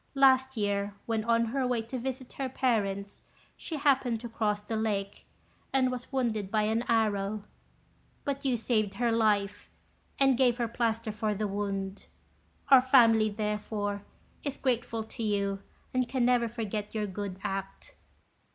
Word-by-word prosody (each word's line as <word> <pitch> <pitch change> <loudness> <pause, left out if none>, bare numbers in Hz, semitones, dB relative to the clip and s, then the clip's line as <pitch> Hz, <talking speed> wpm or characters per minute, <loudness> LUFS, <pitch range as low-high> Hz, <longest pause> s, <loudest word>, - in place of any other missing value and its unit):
Last 265 -1 +4
year, 200 -1 -1
when 225 -1 -1
on 230 0 +3
her 255 +3 -1
way 240 -2 0
to 250 +3 -5
visit 260 +1 -5
her 270 -1 -3
parents, 200 -6 -1 0.3
she 325 - -6
happened 265 -5 +2
to 240 - -6
cross 215 -2 0
the 210 +2 -5
lake, 205 -3 -2 0.4
and 260 -1 +2
was 250 +1 -6
wounded 225 -7 -1
by 215 +1 +2
an 220 +2 +1
arrow; 215 -2 +1 0.8
but 280 -1 -3
you 260 -3 +1
saved 215 -3 0
her 235 +2 +1
life, 205 -3 +1 0.5
and 270 -2 +4
gave 245 -2 +4
her 240 -2 0
plaster 230 -1 -1
for 215 0 -1
the 210 +1 -1
wound. 195 -1 -3 0.6
Our 270 -2 +9
family, 230 -4 +5
therefore, 210 -1 -2 0.4
is 285 -2 -3
grateful 240 -3 -1
to 220 - -9
you, 200 -2 0 0.3
and 255 -2 +1
can 255 -1 +1
never 245 -1 +3
forget 220 -2 -4
your 215 -1 0
good 195 -1 -5
act. 195 0 -5
225 Hz, 155 wpm, -29 LUFS, 205-250 Hz, 0.8 s, Our